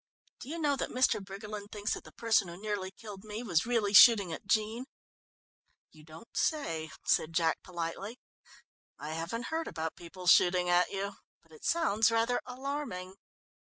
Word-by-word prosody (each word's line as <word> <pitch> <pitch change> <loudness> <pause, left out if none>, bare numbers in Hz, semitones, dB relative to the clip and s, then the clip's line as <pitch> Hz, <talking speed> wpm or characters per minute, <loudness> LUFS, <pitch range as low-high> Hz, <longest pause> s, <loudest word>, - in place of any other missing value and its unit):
Do - - -9
you 330 - -4
know 295 -3 +1
that - - -2
Mr. 255 -5 +2
Briggerland 205 +1 -8
thinks 210 0 -2
that - - -7
the - - -12
person 225 -4 +2
who 170 +1 -9
nearly 205 -2 -3
killed 200 0 -11
me 215 +2 -6
was 175 -3 +1
really 225 -4 +1
shooting 205 -6 +8
at 195 - -8
Jean." 220 +4 0 1.1
"You 155 -1 -17
don't 160 +8 -14
say," 165 - -1 0.2
said 160 - +2
Jack 165 -2 +1
politely. 180 +6 -5 0.8
"I 150 - -7
haven't 200 +9 -4
heard 325 0 -1
about 160 0 -4
people 180 +2 -11
shooting 180 0 +5
at 175 0 +4
you 200 0 -4 0.3
but - - -27
it 460 -3 -16
sounds 230 -11 +3
rather 230 +2 +1
alarming." 255 -8 -5
205 Hz, 165 wpm, -31 LUFS, 180-230 Hz, 1.1 s, shooting